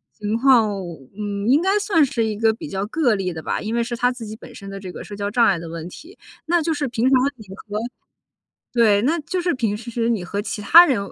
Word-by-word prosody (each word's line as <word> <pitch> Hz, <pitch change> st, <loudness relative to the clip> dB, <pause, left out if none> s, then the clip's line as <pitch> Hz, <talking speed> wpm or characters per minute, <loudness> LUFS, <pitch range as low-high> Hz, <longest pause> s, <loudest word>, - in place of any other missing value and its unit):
情 210 Hz, +1 st, -3 dB
况， 240 Hz, -3 st, +5 dB, 0.5 s
嗯， 205 Hz, 0 st, -3 dB
应 280 Hz, +6 st, +4 dB
该 385 Hz, +3 st, +2 dB
算 395 Hz, -7 st, +3 dB
是 250 Hz, -4 st, -1 dB
一 215 Hz, -1 st, -3 dB
个 220 Hz, +1 st, +3 dB
比 275 Hz, +8 st, -8 dB
较 195 Hz, -4 st, -3 dB
个 245 Hz, +2 st, +1 dB
例 190 Hz, -3 st, -2 dB
的 160 Hz, -1 st, -7 dB
吧， -, -, -2 dB
因 220 Hz, +2 st, -3 dB
为 235 Hz, -, +1 dB
是 240 Hz, +1 st, -4 dB
他 245 Hz, +1 st, +1 dB
自 245 Hz, -3 st, -8 dB
己 215 Hz, +1 st, -7 dB
本 -, -, -13 dB
身 200 Hz, -, -10 dB
的 195 Hz, 0 st, -6 dB
这 190 Hz, -2 st, -8 dB
个 -, -, -8 dB
社 205 Hz, -, -9 dB
交 205 Hz, 0 st, -3 dB
障 235 Hz, +2 st, +3 dB
碍 195 Hz, -5 st, +2 dB
的 165 Hz, 0 st, -8 dB
问 165 Hz, 0 st, -6 dB
题， 335 Hz, -, -13 dB, 0.3 s
那 345 Hz, +1 st, +2 dB
就 320 Hz, +1 st, 0 dB
是 290 Hz, -1 st, -2 dB
平 230 Hz, -1 st, -2 dB
常 -, -, +4 dB, 0.2 s
你 215 Hz, -5 st, -14 dB
和 210 Hz, 0 st, -6 dB, 1.0 s
对， 220 Hz, -4 st, +4 dB
那 310 Hz, +9 st, +1 dB
就 355 Hz, +5 st, -3 dB
是 350 Hz, 0 st, 0 dB
平 225 Hz, -6 st, -1 dB
时 230 Hz, +1 st, -3 dB
你 225 Hz, -6 st, 0 dB
和 200 Hz, +3 st, -3 dB
其 210 Hz, 0 st, -5 dB
他 335 Hz, +12 st, +8 dB
人， 270 Hz, -7 st, +1 dB
230 Hz, 275 characters per minute, -21 LUFS, 205-275 Hz, 1.0 s, 他